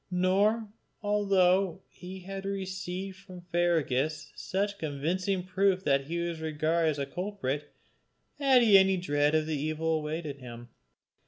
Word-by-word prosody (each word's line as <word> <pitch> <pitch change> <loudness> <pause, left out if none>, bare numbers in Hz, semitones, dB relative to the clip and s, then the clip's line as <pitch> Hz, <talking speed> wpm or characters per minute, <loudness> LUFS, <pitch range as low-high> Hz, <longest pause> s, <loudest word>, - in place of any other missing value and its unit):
Nor, 195 +5 +2 0.4
although 195 -3 +2
he 185 +1 -10
had 195 +1 -6
received 190 -1 -4
from 185 -2 -12
Fergus 155 -4 0
such 200 +1 -2
convincing 175 +6 -1
proof 190 0 +1
that 140 -3 +2
he 170 +2 -3
was 170 -1 -3
regarded 160 +1 +1
as 150 - -2
a 140 - -1
culprit, 150 -4 -4 0.7
had 265 -3 +5
he 205 -4 +8
any 190 0 +3
dread 145 -3 +1
of 155 0 +1
evil 155 +1 -1
awaiting 150 -2 -4
him. 120 -1 -10
180 Hz, 135 wpm, -29 LUFS, 155-195 Hz, 0.7 s, he